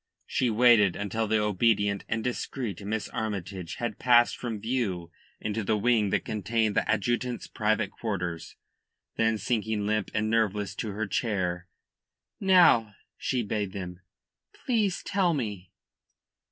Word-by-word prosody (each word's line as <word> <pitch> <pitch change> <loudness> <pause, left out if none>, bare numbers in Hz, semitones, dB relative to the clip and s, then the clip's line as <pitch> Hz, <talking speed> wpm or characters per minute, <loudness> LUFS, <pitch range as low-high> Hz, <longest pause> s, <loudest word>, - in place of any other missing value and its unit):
She 125 - 0
waited 110 -4 +5
until 110 +2 -2
the 110 +1 +2
obedient 105 -1 +1
and 115 0 -1
discreet 120 -5 -3
Miss 110 +2 -2
Armytage 95 -5 -4
had 120 -4 -4
passed 120 -1 +5
from 115 -4 -4
view 100 -7 -2 0.3
into 105 +1 -2
the 105 +2 +1
wing 110 -1 +2
that - - 0
contained 110 +1 0
the - - +1
adjutant's 120 +4 0
private 110 -1 0
quarters, 90 -7 -4 0.6
then 110 0 +2
sinking 110 -2 -1
limp 110 -1 0
and 110 0 +1
nerveless 105 -3 0
to 110 - -3
her 110 +2 -2
chair: 95 -4 -1 0.7
"Now," 170 - +5 0.2
she 125 -3 -1
bade 105 -2 -2
them, 90 -3 -6 0.7
"please 215 -7 +1
tell 185 -4 +1
me." 105 -9 -4
110 Hz, 135 wpm, -28 LUFS, 100-120 Hz, 0.7 s, waited